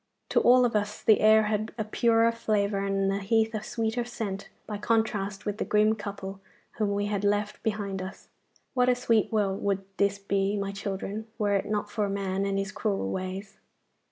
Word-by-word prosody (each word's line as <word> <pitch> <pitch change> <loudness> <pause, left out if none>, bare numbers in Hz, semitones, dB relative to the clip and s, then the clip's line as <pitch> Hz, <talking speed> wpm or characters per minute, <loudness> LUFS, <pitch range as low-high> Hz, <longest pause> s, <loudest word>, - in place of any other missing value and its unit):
To - - +4
all 250 +1 +6
of 230 - 0
us 210 0 -1
the 220 - +5
air 220 0 +6
had 215 +1 -2
a 220 - 0
purer 230 +1 +3
flavour 210 -3 0
and 195 0 +1
the 195 - -1
heath 220 +3 +1
a 215 - -2
sweeter 225 +2 -2
scent 220 -5 -5 0.2
by 210 -1 -5
contrast 210 -3 0
with 210 +1 -3
the - - +1
grim 215 +1 +3
couple 200 -2 -6 0.4
whom 205 -2 +1
we 205 0 0
had 205 -1 -2
left 205 +1 0
behind 200 -3 -2
us. 185 +1 -8 0.5
What 250 -2 +3
a 250 - +4
sweet 230 -3 +2
world 200 -3 0
would 195 -1 0
this 200 0 +2
be, 200 0 0
my 200 0 -2
children, 200 +2 -4
were 205 -2 +1
it 195 - 0
not 210 -1 -1
for 210 -2 0
man 195 0 -1
and 195 0 0
his 195 +1 -2
cruel 195 - -1
ways! 190 +2 -5
205 Hz, 195 wpm, -28 LUFS, 195-220 Hz, 0.5 s, all